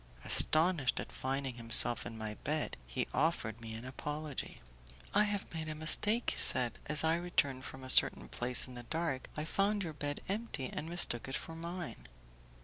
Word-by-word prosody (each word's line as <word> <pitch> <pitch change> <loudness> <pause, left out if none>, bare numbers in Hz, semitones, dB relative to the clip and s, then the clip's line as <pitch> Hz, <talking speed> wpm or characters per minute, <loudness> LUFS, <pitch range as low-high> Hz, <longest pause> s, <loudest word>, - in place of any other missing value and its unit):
Astonished 155 -4 +4
at - - -6
finding 135 -1 -3
himself 115 +1 +2
in 115 - -8
my 110 -1 -4
bed, 155 0 -1
he - - -2
offered 125 -7 0
me 110 -1 -7
an 115 +2 -7
apology: 150 +2 -5 0.5
"I 210 +1 +5
have 205 -3 -3
made 160 -1 -4
a 155 - -4
mistake," 210 +9 +3
he - - -4
said, 120 -2 +5
"as 150 0 +3
I 160 0 +3
returned 145 -7 0
from 130 0 -9
a - - -7
certain - - +3
place 125 +1 +1
in 130 - -11
the 120 - -7
dark, 155 +1 -3
I 150 - -2
found 200 +4 +1
your 160 -3 -5
bed 145 -1 -4
empty, 200 - -3
and 160 - -4
mistook 170 -9 0
it 135 - -3
for 165 - -6
mine." 170 - -6
150 Hz, 185 wpm, -34 LUFS, 125-170 Hz, 0.5 s, I